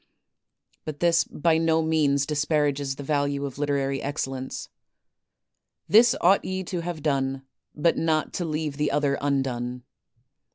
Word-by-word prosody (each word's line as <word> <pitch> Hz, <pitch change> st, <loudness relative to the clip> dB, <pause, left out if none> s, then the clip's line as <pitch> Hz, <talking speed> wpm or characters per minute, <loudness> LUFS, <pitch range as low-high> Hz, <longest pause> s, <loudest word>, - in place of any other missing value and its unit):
But 150 Hz, -2 st, -6 dB
this 170 Hz, -1 st, +3 dB
by 160 Hz, +1 st, +1 dB
no 160 Hz, 0 st, +2 dB
means 145 Hz, -3 st, +2 dB
disparages 145 Hz, -2 st, 0 dB
the 140 Hz, -, -7 dB
value 140 Hz, -1 st, 0 dB
of 135 Hz, 0 st, -7 dB
literary 140 Hz, -2 st, 0 dB
excellence. 135 Hz, -2 st, -4 dB, 1.2 s
This 230 Hz, +4 st, +6 dB
ought 190 Hz, +3 st, +4 dB
ye 190 Hz, 0 st, -3 dB
to 180 Hz, 0 st, -4 dB
have 170 Hz, -3 st, -5 dB
done, 135 Hz, -2 st, 0 dB, 0.3 s
but 160 Hz, +3 st, +2 dB
not 160 Hz, -1 st, 0 dB
to 180 Hz, -, -2 dB
leave 155 Hz, -2 st, -3 dB
the 150 Hz, 0 st, +1 dB
other 145 Hz, -1 st, 0 dB
undone. 125 Hz, -3 st, -2 dB
145 Hz, 135 wpm, -25 LUFS, 140-160 Hz, 1.2 s, This